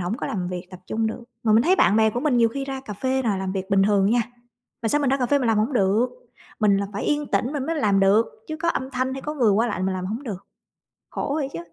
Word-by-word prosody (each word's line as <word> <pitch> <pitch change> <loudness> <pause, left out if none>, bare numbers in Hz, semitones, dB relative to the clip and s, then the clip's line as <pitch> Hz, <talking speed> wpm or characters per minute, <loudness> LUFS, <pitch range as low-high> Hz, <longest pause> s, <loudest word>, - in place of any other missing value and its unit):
hổng 180 +5 -2
có - - -4
làm 180 -4 -3
việc, 180 0 -5
tập 185 -1 -11
trung 225 0 -1
được. 220 +2 -4 0.2
Mà 220 - +2
mình 220 +2 +5
thấy 365 +7 +3
bạn 205 - +4
bè 220 0 +4
của 240 - -3
mình 280 -3 +1
nhiều 230 -1 +4
khi 275 +4 -4
ra 270 -1 -5
cà 240 -5 -8
phê 260 +6 -1
là 215 -5 0
làm 190 0 -3
việc 190 0 -4
bình 195 0 +4
thường 200 0 +3
nha, 240 +1 +3 0.6
mà 225 - 0
sao 295 +6 +2
mình 280 -3 +1
ra 270 - +3
cà 255 -2 0
phê 285 +3 +3
mình 260 - -1
làm 220 -2 +3
hổng 220 +6 0
được. 215 +1 +2 0.5
Mình 205 -2 +4
là 200 0 -1
phải 200 - -4
yên 295 0 0
tĩnh 255 0 0
mình 280 -3 -3
mới 330 - -1
làm 205 -8 +2
được, 200 +4 +4 0.2
chứ 315 - -4
có 335 +2 -2
âm 265 -5 -1
thanh 260 0 -1
hay 265 0 -6
có 300 - -4
người 245 -7 +3
qua 220 +4 +2
lại 205 -5 -3
mình 190 0 0
làm 185 0 -4
hổng 220 +7 -4
được. 205 -8 -7 0.6
Khổ 280 - -3
vậy 285 -4 -1
chứ. - - -5
225 Hz, 305 wpm, -23 LUFS, 200-265 Hz, 0.6 s, mình